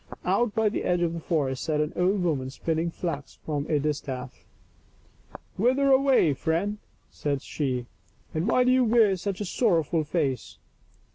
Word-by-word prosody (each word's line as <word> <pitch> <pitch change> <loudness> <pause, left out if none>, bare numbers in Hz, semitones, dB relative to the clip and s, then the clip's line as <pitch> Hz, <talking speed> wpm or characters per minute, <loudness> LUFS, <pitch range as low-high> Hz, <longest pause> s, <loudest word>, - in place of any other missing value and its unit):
Out 240 -3 +1
by 220 -1 +3
the 210 - -1
edge 175 -1 +1
of 165 -1 0
the 170 - -4
forest 145 -6 -1
sat 155 -2 0
an 150 0 -1
old 185 +2 +1
woman 140 -7 -1
spinning 165 +4 -2
flax 165 -5 -5
from 145 -2 -2
a 150 - +3
distaff. 135 -4 -4 0.5
" - - -20
Whither 260 +5 +3
away, 265 - +4
friend 175 +9 -1 0.2
?" - - -39
said 140 -2 -2
she, 130 -5 -2 0.2
" - - -34
and 160 +5 -1
why 250 +2 +4
do 250 - +3
you 255 0 +4
wear 225 -4 +4
such 195 +2 -4
a - - -2
sorrow 180 -4 +2
ful 160 +2 -1
face?" 145 -5 -2
165 Hz, 185 wpm, -26 LUFS, 145-210 Hz, 0.5 s, away